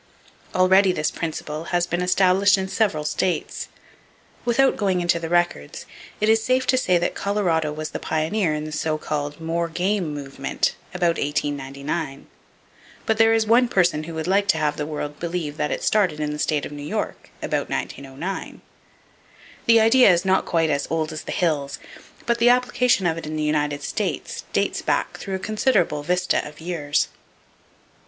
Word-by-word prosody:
Already 190 +1 +5
this 155 -4 -1
principle 155 -1 -4
has 175 0 +1
been 175 0 -2
established 190 +2 +4
in 190 0 -2
several 190 -7 0
states. 175 +4 -2 0.8
Without 265 +3 +3
going 190 -3 +1
into 175 -1 +1
the 165 -1 -5
records, 175 - 0 0.3
it 215 - +1
is 220 0 +4
safe 255 +1 +1
to - - +3
say 185 -8 +3
that 175 - -1
Colorado 175 -7 0
was 155 +1 -5
the - - -4
pioneer 160 +3 0
in 150 0 -2
the 155 - -6
so 155 +1 -1
called 145 -1 -4
"more 165 +1 -1
game" 180 0 -1
movement, 140 -1 -2 0.2
about 175 -2 0
1899; 140 0 -3 0.8
but 220 0 0
there 225 0 +6
is 225 -1 +3
one 240 +3 +4
person 175 -8 +1
who 165 0 -7
would 160 -1 -3
like 200 +3 +2
to 205 - +3
have 150 -1 0
the 150 - -4
world 150 -1 -5
believe 170 -3 -3
that 150 - -1
it - - -3
started 190 -8 +2
in 150 -1 -1
the 150 - -6
state 150 -1 0
of - - -8
New 145 0 -7
York, 145 - -4
about - - -1
1909. 140 +8 -5 1.1
The 230 -1 +7
idea 225 0 +6
is 175 +1 +1
not 190 0 +2
quite 165 -2 +2
as 140 -1 -1
"old 155 -1 -1
as 155 - -5
the - - -5
hills," 150 -5 0 0.5
but 235 0 +1
the 235 +1 +5
application 250 -4 +3
of 165 -1 +1
it 160 - -8
in 155 - -4
the 155 - -1
United 150 -1 0
States - - -3
dates - - 0
back - - -1
through 195 - -4
a - - -1
considerable 210 - +1
vista 180 +4 +1
of 150 - -12
years. 160 -4 -1
170 Hz, 180 wpm, -23 LUFS, 150-195 Hz, 1.1 s, The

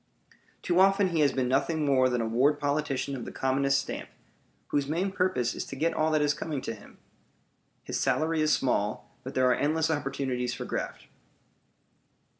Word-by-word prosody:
Too 175 0 +2
often 195 0 +4
he 170 -2 -1
has 145 -3 +4
been 130 -1 0
nothing 150 +4 +1
more 130 -2 +4
than 125 -1 0
a - - -1
ward 130 +6 +2
politician 140 -2 -1
of 125 - -6
the - - -7
commonest 135 +1 +1
stamp, 135 - -4 0.6
whose 145 -1 0
main 175 +6 -1
purpose 180 -11 0
is - - -4
to - - -7
get 160 +5 0
all 155 0 +1
that 155 -1 +2
is 145 0 +2
coming 150 0 -4
to 115 - -4
him. 105 -2 -15 0.9
His - - -3
salary 160 0 +1
is 155 0 +2
small, 105 -7 0
but 130 - -7
there 130 0 +3
are 125 - +5
endless 155 +4 +1
opportunities 135 -4 -2
for - - -6
graft. - - -4
140 Hz, 185 wpm, -28 LUFS, 130-155 Hz, 0.9 s, are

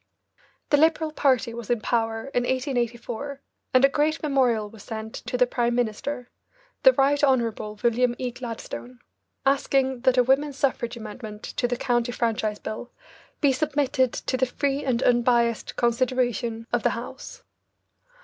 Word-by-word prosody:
The 290 - +6
Liberal 315 +1 +3
party 260 -6 +2
was 235 -2 -7
in 240 -2 +2
power 225 0 0
in 245 - +2
1884, 250 +1 -2 0.3
and 255 +1 +6
a - - +7
great 305 +3 0
memorial 250 -7 +2
was 215 0 -13
sent 220 +1 -6
to 250 - -4
the 250 - +5
Prime 240 -1 0
Minister, 245 +2 -2 0.5
the - - +8
Right 285 - +2
Honourable 230 -5 +1
William 240 +1 +2
E. 250 -1 -3
Gladstone, 245 +1 -7 0.5
asking 270 -1 +2
that 260 0 +3
a 250 - +6
women's 270 +2 +1
suffrage 250 -4 -1
amendment 215 -1 -8
to 245 - -2
the 245 0 -2
County 240 -1 0
Franchise 220 -3 -1
Bill 220 +4 -6 0.5
be 285 - +5
submitted 275 -2 +1
to 260 - -2
the 260 0 +2
free 280 +2 -1
and 255 -2 0
unbiased 235 -1 +2
consideration 240 -2 0
of 240 - +2
the - - +3
House. 265 - -9
245 Hz, 150 wpm, -25 LUFS, 235-270 Hz, 0.5 s, the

